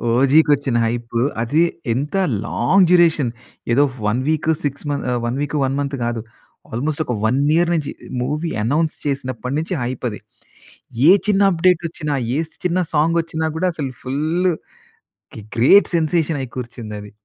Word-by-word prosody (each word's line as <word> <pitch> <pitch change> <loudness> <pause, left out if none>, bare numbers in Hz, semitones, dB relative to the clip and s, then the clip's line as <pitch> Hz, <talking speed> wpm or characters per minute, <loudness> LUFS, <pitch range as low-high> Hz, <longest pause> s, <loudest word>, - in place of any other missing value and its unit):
ఓజికి 140 +5 +4
వచ్చిన 135 -3 -1
హైప్ 120 +1 -4 0.3
అది 145 +8 +2 0.3
ఎంత 145 +9 -3 0.3
లాంగ్ 180 +9 +3
డ్యూరేషన్, 165 -8 +4 0.4
ఏదో 135 +5 +4 0.2
1 115 +5 +1
వీక్, 155 0 0
6 145 +1 -3
మంత్ 145 - -2 0.2
1 120 +3 -2
వీక్, 145 +1 -3
1 135 - -1
మంత్ 140 0 -2
కాదు. 120 -1 -2 0.5
ఆల్‌మోస్ట్ 145 +6 -2
ఒక 125 - -2
1 125 +5 +2 0.2
ఇయర్ 170 +1 +3
నుంచి 155 -4 -1 0.3
మూవీ 150 +6 -2
అనౌన్స్ 155 +7 0
చేసినప్పటి 130 -2 -3
నుంచి 165 +4 -3
హైప్ 125 +1 -4
అది. 105 - -8 0.9
ఏ - - +10 0.2
చిన్న 200 -1 +3
అప్‌డేట్ 175 0 +3
వచ్చినా, 150 -3 -3 0.2
ఏ - - +1 0.3
చిన్న 180 +1 +1
సాంగ్ 160 +3 +2
వచ్చినా 160 -1 -3
కూడా 185 +2 +1
అసలు 140 -4 -4
ఫుల్లు 160 +7 0 0.8
గె 110 - -8 0.2
గ్రేట్ 175 - +6
సెన్సేషన్ 160 -1 +1
అయి 130 - -6
కూర్చింది 120 -3 -6
అది. 105 0 -11
145 Hz, 155 wpm, -20 LUFS, 125-165 Hz, 0.9 s, ఏ